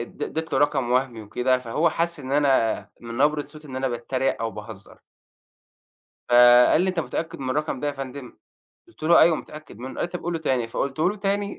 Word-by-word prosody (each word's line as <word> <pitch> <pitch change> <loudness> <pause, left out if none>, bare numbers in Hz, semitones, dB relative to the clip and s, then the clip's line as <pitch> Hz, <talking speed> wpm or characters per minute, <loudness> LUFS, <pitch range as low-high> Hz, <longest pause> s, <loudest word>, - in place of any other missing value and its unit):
اد 120 - -10
اديت 160 +1 -4
له - - +2
رقم 135 -4 +1
وهمي 125 -3 0
وكده، 125 +5 0
فهو 130 +7 0
حَس 170 -1 -2
إن 135 0 -6
أنا 135 -6 +2
من 115 0 -8
نبرة 145 +3 +2
صوتي 155 +1 -14
إن 130 - -7
أنا 130 0 -1
باتريق 125 +2 -2
أو 115 - -1
باهزر. 105 -2 -11 1.3
فقال 120 +4 +7
لي: 190 - 0
"أنت 180 -2 -2
متأكد 165 +1 -4
من 130 -1 -4
الرقم 150 0 -1
ده 145 - -3
يا 145 - 0
فندم؟" 135 -2 -8 0.5
قُلت 345 - -21
له: 170 +2 +6
"أيوه 160 -1 +5
متأكد 150 -7 -11
منّه." 130 +2 -7
قال - - -3
لي: - - -1
"طب 180 0 -6
قوله 170 -1 -2
تاني." 130 -7 0
فقُلته 140 +8 -1
له 210 - -6
تاني 200 0 -2
135 Hz, 205 wpm, -24 LUFS, 125-160 Hz, 1.3 s, فقال